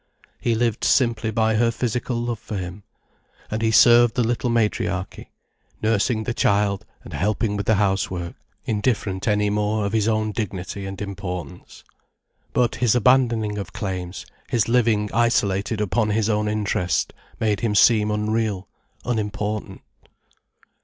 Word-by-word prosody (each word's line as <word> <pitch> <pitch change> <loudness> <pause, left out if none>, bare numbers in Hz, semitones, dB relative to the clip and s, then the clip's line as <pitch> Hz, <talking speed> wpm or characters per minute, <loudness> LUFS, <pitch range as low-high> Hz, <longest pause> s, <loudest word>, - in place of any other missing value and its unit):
He 115 - 0
lived 115 -1 0
simply 115 -4 +2
by 110 0 +1
her 115 +1 +3
physical 120 +1 -2
love 120 -2 -3
for 105 - -6
him. 90 +2 -6 0.7
And 110 +1 -2
he 110 - +2
served 120 +1 +6
the 125 - +2
little 120 +2 -1
matriarchy, 105 -4 -1 0.5
nursing 110 +1 +1
the 120 - -2
child 100 -1 +1 0.2
and - - -10
helping 105 +2 0
with 100 - -3
the 110 - +4
housework, 95 -3 -1 0.3
indifferent 105 -3 -1
any 105 -1 +2
more 105 0 0
of 100 - -3
his 110 -1 +2
own 110 -1 +1
dignity 100 -2 -4
and 95 0 -7
importance. 90 -6 -7 0.7
But 125 -1 +1
his 120 -2 +2
abandoning 115 -4 +2
of 95 -4 -7
claims, 95 -4 -5 0.2
his 115 -3 +1
living 115 -3 +2
isolated 105 -2 +1
upon 105 +2 0
his 110 +1 +1
own 105 0 0
interest, 105 -4 -1 0.3
made 105 -3 +1
him 110 -3 -1
seem 105 -1 +5
unreal, 105 -2 -1 0.4
unimportant. 105 -2 -3
105 Hz, 140 wpm, -23 LUFS, 100-115 Hz, 0.7 s, served